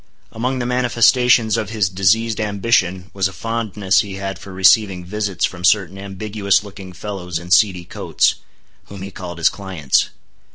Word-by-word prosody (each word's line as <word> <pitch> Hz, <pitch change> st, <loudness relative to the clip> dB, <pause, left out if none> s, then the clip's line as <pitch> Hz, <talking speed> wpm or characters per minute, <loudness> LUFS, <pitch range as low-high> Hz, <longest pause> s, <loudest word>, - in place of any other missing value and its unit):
Among 125 Hz, +4 st, -2 dB
the 120 Hz, -, -2 dB
manifestations 120 Hz, -1 st, +3 dB
of 105 Hz, -, -3 dB
his 110 Hz, -4 st, 0 dB
diseased 105 Hz, +4 st, +1 dB
ambition 100 Hz, -3 st, 0 dB
was 95 Hz, -1 st, +1 dB
a -, -, -9 dB
fondness 105 Hz, -3 st, 0 dB
he 100 Hz, -2 st, -7 dB
had 95 Hz, -2 st, -5 dB
for 100 Hz, -, -11 dB
receiving 95 Hz, -1 st, +3 dB
visits 100 Hz, -1 st, -1 dB
from 90 Hz, -1 st, -7 dB
certain 95 Hz, 0 st, +2 dB
ambiguous 100 Hz, +1 st, -1 dB
looking 100 Hz, -2 st, -10 dB
fellows 90 Hz, -1 st, -5 dB
in 85 Hz, +2 st, -9 dB
seedy 95 Hz, -3 st, +4 dB
coats, 85 Hz, -, 0 dB, 0.5 s
whom 100 Hz, -1 st, -10 dB
he 100 Hz, -, -7 dB
called 90 Hz, -2 st, -8 dB
his 85 Hz, -, +3 dB
clients. 90 Hz, -9 st, -1 dB
100 Hz, 160 wpm, -19 LUFS, 95-110 Hz, 0.5 s, seedy